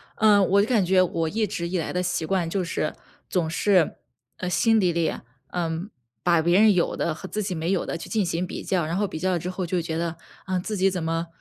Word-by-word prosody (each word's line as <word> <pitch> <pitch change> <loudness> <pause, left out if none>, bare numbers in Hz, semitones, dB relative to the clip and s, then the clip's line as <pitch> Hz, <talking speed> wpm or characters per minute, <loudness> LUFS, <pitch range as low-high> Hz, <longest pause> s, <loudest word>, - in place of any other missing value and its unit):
嗯， 205 -3 +5
我 200 +1 +5
就 205 - 0
感 225 -7 +2
觉 185 +1 +4
我 165 -3 0
一 215 +3 0
直 170 -3 -3
以 185 - -1
来 165 - -3
的 180 - 0
习 175 -2 -1
惯 175 -1 0
就 185 +2 -1
是， 160 -2 -2 0.4
总 170 -3 0
是， 180 0 +2 0.4
呃， 180 - -3
心 225 +4 +3
底 180 -4 +3
里， 165 -1 0 0.4
嗯， 170 +2 -2 0.3
把 170 -2 +4
别 175 +4 +4
人 215 -1 +6
有 180 -2 +1
的 165 - -1
和 190 - -8
自 215 - -2
己 190 -3 -3
没 165 +2 -1
有 190 - 0
的 - - -3
去 - - -9
进 215 -3 +1
行 175 +1 -1
比 - - -6
较。 180 -4 0
然 165 +3 -2
后 205 +1 +1
比 160 - -6
较 185 +3 0
了 175 - +1
之 180 - -4
后 185 0 -3
就 175 +1 -1
觉 160 -1 -3
得， 165 0 -2 0.3
嗯， 185 -1 0
自 215 +4 -4
己 195 0 +3
怎 180 -2 -3
么， 165 +1 -1
180 Hz, 280 characters per minute, -25 LUFS, 165-195 Hz, 0.4 s, 人